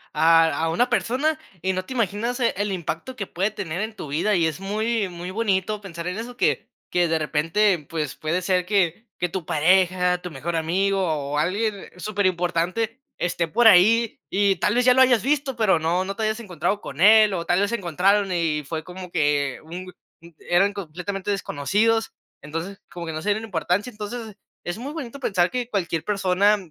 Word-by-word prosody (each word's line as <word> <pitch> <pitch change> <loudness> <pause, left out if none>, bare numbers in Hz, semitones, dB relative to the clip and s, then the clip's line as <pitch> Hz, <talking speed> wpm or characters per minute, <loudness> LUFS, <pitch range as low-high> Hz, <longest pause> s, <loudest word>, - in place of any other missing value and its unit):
a 165 0 +5 0.2
a - - 0
una 240 +10 +1
persona 300 +6 0 0.2
y 190 0 0
no 185 0 -3
te - - -7
imaginas, 230 +1 -1
eh, 235 - +2
el 205 0 -1
impacto 180 +7 -4
que 210 -5 -4
puede 195 +5 -1
tener 190 -4 -4
en 220 0 -4
tu 155 - -7
vida. 175 +8 +1
Y 170 - +2
es 160 +3 -4
muy 215 +2 -1
muy 175 +1 -7
bonito 205 -1 0
pensar 170 -4 -7
en 180 +2 -3
eso 240 +2 -6
que - - +1 0.2
que 175 -1 +2
de 165 0 +1
repente, 165 +3 +1
pues, 155 -4 -3
puede 165 +3 -1
ser 180 -1 +1
que 195 +2 0
que 180 - 0
tu 175 -1 -4
pareja, 180 +2 +3
tu 180 - -6
mejor 160 +4 -4
amigo, 190 +5 +1
o 145 -4 -1
alguien 200 +5 -1
super 205 +1 -2
importante, 180 +6 0 0.2
esté 170 -1 -1
por 230 +7 +4
ahí, 220 +4 +5
y 195 -1 +2
tal 205 +6 +1
vez 245 - +3
ya 250 - +7
lo 260 - +4
habías 245 -5 +5
visto, 280 -1 0
pero 215 -7 +3
no 170 +4 0
no 195 +1 -4
te 220 - -3
habías 215 +1 0
encontrado 205 -1 -2
con 140 +3 -9
él, 215 +1 +7
o 170 -2 -3
tal 175 +2 +2
vez 205 - +1
se 235 - 0
encontraron 195 +2 +1
y 165 -4 0
fue 160 +3 -4
como 180 +1 -9
que, 145 -4 +1
un 175 +4 -7
g 185 - -11 0.3
mm, 170 - -13 0.2
eran 195 +3 +3
completamente 195 +2 -4
desconocidos. 205 +5 0 0.3
Entonces, 165 +7 -6
como 175 -1 -6
que 160 - -5
no 155 - -4
se 205 - -2
dieron 215 +2 0
importancia. 185 +3 -1
Entonces, 215 -1 -7 0.3
es 175 +2 -3
muy 270 +6 -6
bonito 280 -4 -7
pensar 185 -8 +1
que 250 -2 -3
cualquier 170 -6 -1
persona 200 0 +2
190 Hz, 205 wpm, -23 LUFS, 170-215 Hz, 0.3 s, ya